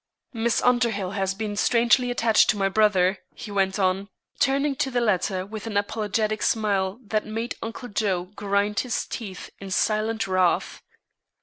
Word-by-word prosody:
Miss 230 Hz, 0 st, 0 dB
Underhill 230 Hz, -6 st, +2 dB
has 195 Hz, -1 st, -1 dB
been 210 Hz, 0 st, -4 dB
strangely 240 Hz, +3 st, +3 dB
attached 230 Hz, -2 st, +3 dB
to -, -, +3 dB
my 195 Hz, -1 st, +2 dB
brother," 195 Hz, -2 st, +3 dB, 0.2 s
he 210 Hz, -, -8 dB
went 195 Hz, -1 st, +1 dB
on, 190 Hz, +1 st, 0 dB, 0.3 s
turning 275 Hz, +1 st, +2 dB
to 265 Hz, -, 0 dB
the 250 Hz, -2 st, 0 dB
latter 190 Hz, -4 st, 0 dB
with 215 Hz, +2 st, -7 dB
an 210 Hz, -2 st, -2 dB
apologetic 215 Hz, +1 st, -1 dB
smile 200 Hz, -2 st, 0 dB
that 215 Hz, 0 st, -1 dB
made 225 Hz, +3 st, -3 dB
Uncle 230 Hz, +2 st, -6 dB
Joe 200 Hz, -4 st, 0 dB
grind 205 Hz, 0 st, 0 dB
his 250 Hz, -3 st, -2 dB
teeth 200 Hz, -6 st, -7 dB
in 195 Hz, -, -8 dB
silent 215 Hz, +3 st, 0 dB
wrath. 185 Hz, -2 st, +1 dB
210 Hz, 160 wpm, -25 LUFS, 195-225 Hz, 0.3 s, strangely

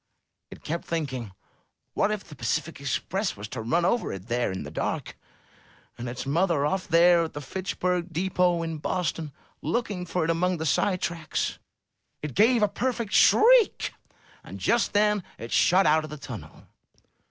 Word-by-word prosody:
It -, -, -12 dB
kept 170 Hz, +2 st, -3 dB
thinking, 130 Hz, -10 st, -3 dB, 0.6 s
What -, -, +2 dB
if 215 Hz, -2 st, -2 dB
the 160 Hz, -, -13 dB
Pacific 140 Hz, +5 st, -2 dB
Express 180 Hz, -, -2 dB
was 100 Hz, +2 st, -6 dB
to 115 Hz, -, -5 dB
run 165 Hz, +10 st, +1 dB
over 235 Hz, +5 st, +1 dB
it 95 Hz, +3 st, -8 dB
there 120 Hz, -3 st, 0 dB
in 95 Hz, -, -4 dB
the -, -, -8 dB
dark, -, -, -3 dB, 0.8 s
and 120 Hz, 0 st, -5 dB
its 125 Hz, +2 st, -5 dB
mother 160 Hz, 0 st, +1 dB
off 185 Hz, +5 st, -1 dB
there 170 Hz, 0 st, +5 dB
at 160 Hz, -, -8 dB
the 145 Hz, -, -5 dB
Fitchburg 180 Hz, +3 st, -2 dB
Depot, 175 Hz, 0 st, +1 dB
in 165 Hz, -2 st, -4 dB
Boston, 165 Hz, -2 st, -2 dB, 0.3 s
looking 205 Hz, -7 st, -2 dB
for 175 Hz, 0 st, -1 dB
it 165 Hz, -, +1 dB
among 180 Hz, +2 st, +1 dB
the 160 Hz, -, -4 dB
side 180 Hz, +5 st, +1 dB
tracks? 165 Hz, -2 st, -2 dB, 0.6 s
It 150 Hz, -3 st, -4 dB
gave 225 Hz, +3 st, +4 dB
a -, -, +5 dB
perfect 235 Hz, 0 st, -2 dB
shriek; 475 Hz, 0 st, +5 dB, 0.5 s
and -, -, -9 dB
just 235 Hz, -4 st, +1 dB
then 210 Hz, -1 st, +3 dB
it 115 Hz, -, -8 dB
shot 190 Hz, +2 st, +4 dB
out 155 Hz, +1 st, +4 dB
of 155 Hz, -, -7 dB
the 150 Hz, -, -7 dB
tunnel. 140 Hz, -, -9 dB
170 Hz, 170 wpm, -26 LUFS, 150-190 Hz, 0.8 s, there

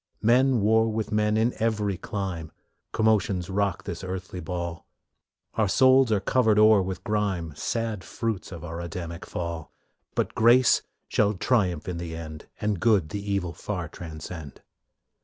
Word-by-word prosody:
Men 125 Hz, +1 st, +4 dB
war 110 Hz, +2 st, +4 dB
with 110 Hz, -1 st, -3 dB
men 105 Hz, 0 st, +2 dB
in 115 Hz, +2 st, +2 dB
every 105 Hz, -3 st, 0 dB
clime, 90 Hz, -5 st, -4 dB, 0.4 s
Commotions 100 Hz, -4 st, +1 dB
rock 100 Hz, -2 st, 0 dB
this 85 Hz, +2 st, -6 dB
earthly 90 Hz, 0 st, -5 dB
ball; 85 Hz, -1 st, -5 dB, 0.7 s
Our 110 Hz, -2 st, +1 dB
souls 130 Hz, +3 st, +5 dB
are 105 Hz, -, +3 dB
covered 110 Hz, +1 st, +2 dB
o'er 110 Hz, -1 st, +7 dB
with 95 Hz, 0 st, -4 dB
grime 100 Hz, -7 st, -1 dB
Sad 115 Hz, +1 st, -2 dB
fruits 110 Hz, -5 st, -3 dB
of 85 Hz, -2 st, -7 dB
our 85 Hz, +1 st, -5 dB
Adamic 85 Hz, 0 st, -6 dB
fall, 85 Hz, -2 st, -5 dB, 0.4 s
But -, -, 0 dB
grace 120 Hz, +2 st, +5 dB, 0.3 s
shall 105 Hz, 0 st, +2 dB
triumph 90 Hz, -7 st, +1 dB
in 90 Hz, -2 st, -3 dB
the 85 Hz, -1 st, -5 dB
end, 80 Hz, -2 st, -8 dB
And 105 Hz, -3 st, -1 dB
good 100 Hz, -8 st, +3 dB
the 100 Hz, +5 st, -4 dB
evil 90 Hz, -4 st, -1 dB
far 90 Hz, -5 st, -4 dB
transcend. 80 Hz, -2 st, -8 dB
100 Hz, 150 wpm, -26 LUFS, 85-110 Hz, 0.7 s, o'er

